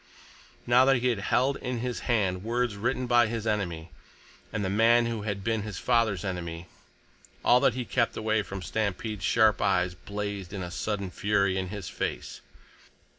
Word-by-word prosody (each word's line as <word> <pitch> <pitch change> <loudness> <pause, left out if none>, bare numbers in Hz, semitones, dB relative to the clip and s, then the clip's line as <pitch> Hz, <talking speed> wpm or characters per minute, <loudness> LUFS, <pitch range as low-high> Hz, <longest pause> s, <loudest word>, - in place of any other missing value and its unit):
Now 120 +2 +5
that 135 0 +5
he 125 0 +2
held 125 +7 +1
in 125 -1 -4
his 125 +1 -3
hand 95 -6 +1
words 120 -1 -1
written 120 +5 -1
by 120 -1 +4
his 115 -1 -4
enemy, 90 -7 -2 0.6
and 105 -2 -2
the - - -1
man 115 +3 +4
who 115 -2 -2
had 100 -2 -4
been 115 0 0
his 105 -3 -6
father's 115 -6 +1
enemy, 85 -2 -4 0.8
all 125 - +6
that 125 - +3
he 130 - -2
had - - -18
kept 115 -3 +1
away 110 0 +1
from 95 -2 -7
Stampede's 110 -1 -3
sharp 110 -2 +3
eyes 90 -2 +2
blazed 100 0 -5
in 95 -2 -4
a 90 - -6
sudden 100 0 -3
fury 100 -1 +1
in 95 -1 -2
his 100 -1 -6
face. - - -4
105 Hz, 175 wpm, -28 LUFS, 95-120 Hz, 0.8 s, all